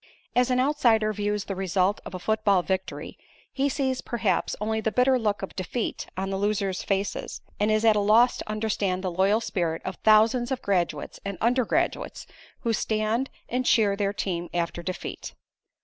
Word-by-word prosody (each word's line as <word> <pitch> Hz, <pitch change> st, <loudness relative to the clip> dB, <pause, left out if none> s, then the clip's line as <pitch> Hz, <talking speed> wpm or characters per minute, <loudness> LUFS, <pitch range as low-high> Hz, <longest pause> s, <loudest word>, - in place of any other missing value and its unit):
As 250 Hz, +1 st, +3 dB
an 250 Hz, 0 st, +2 dB
outsider 235 Hz, -6 st, +3 dB
views 205 Hz, 0 st, -2 dB
the 195 Hz, -, -3 dB
result 190 Hz, +1 st, +1 dB
of 185 Hz, -, -7 dB
a -, -, -5 dB
football 205 Hz, -2 st, +2 dB
victory, 190 Hz, 0 st, -4 dB, 0.3 s
he 275 Hz, +1 st, +1 dB
sees 265 Hz, -2 st, -1 dB
perhaps 220 Hz, -7 st, -1 dB
only 220 Hz, +1 st, -1 dB
the 220 Hz, -, 0 dB
bitter 255 Hz, +2 st, +3 dB
look 210 Hz, -3 st, -1 dB
of 195 Hz, -, -6 dB
defeat 195 Hz, +5 st, -3 dB
on 190 Hz, +1 st, -2 dB
the 195 Hz, -, -2 dB
losers' 200 Hz, -2 st, 0 dB
faces, 195 Hz, 0 st, -2 dB, 0.2 s
and 210 Hz, +1 st, +2 dB
is 215 Hz, +1 st, +2 dB
at 220 Hz, -1 st, +6 dB
a -, -, +3 dB
loss 220 Hz, +4 st, +4 dB
to -, -, -7 dB
understand 205 Hz, -3 st, -1 dB
the 185 Hz, -, -1 dB
loyal 195 Hz, +5 st, +3 dB
spirit 170 Hz, -7 st, -2 dB
of 190 Hz, -, -4 dB
thousands 225 Hz, +3 st, +4 dB
of 260 Hz, -, -2 dB
graduates 175 Hz, -7 st, -1 dB
and 200 Hz, -1 st, -4 dB
undergraduates 245 Hz, +1 st, 0 dB, 0.4 s
who 230 Hz, -, 0 dB
stand 220 Hz, +4 st, 0 dB, 0.2 s
and 255 Hz, +1 st, -1 dB
cheer 205 Hz, -3 st, +4 dB
their 200 Hz, -1 st, 0 dB
team 175 Hz, -4 st, -3 dB
after 170 Hz, 0 st, -1 dB
defeat. 185 Hz, +1 st, -6 dB
210 Hz, 180 wpm, -26 LUFS, 190-230 Hz, 0.4 s, at